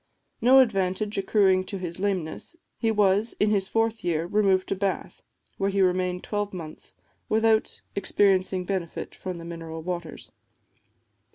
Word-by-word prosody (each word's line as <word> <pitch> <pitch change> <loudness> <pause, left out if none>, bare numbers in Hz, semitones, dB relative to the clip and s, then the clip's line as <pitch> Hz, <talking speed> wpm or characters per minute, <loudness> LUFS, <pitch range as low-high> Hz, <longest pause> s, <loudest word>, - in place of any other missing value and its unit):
No 255 +3 +6
advantage 200 -2 0
accruing 190 -2 +3
to 200 - -5
his 175 -1 -6
lameness, 190 - -3 0.2
he 225 - +1
was, 210 +1 +2
in 210 0 +3
his 195 -2 +1
fourth 225 +1 0
year, 165 -1 0
removed 190 0 +2
to - - 0
Bath, 195 0 -3 0.4
where 195 0 +1
he 200 0 -1
remained 180 -1 +1
twelve 205 -2 -3
months, 160 -3 -8 0.3
without 220 0 +2
experiencing 190 -2 +2
benefit 180 -3 -4
from 185 -2 -6
the 165 - -9
mineral 165 -1 -7
waters. 175 -2 -6
190 Hz, 145 wpm, -26 LUFS, 180-205 Hz, 0.4 s, No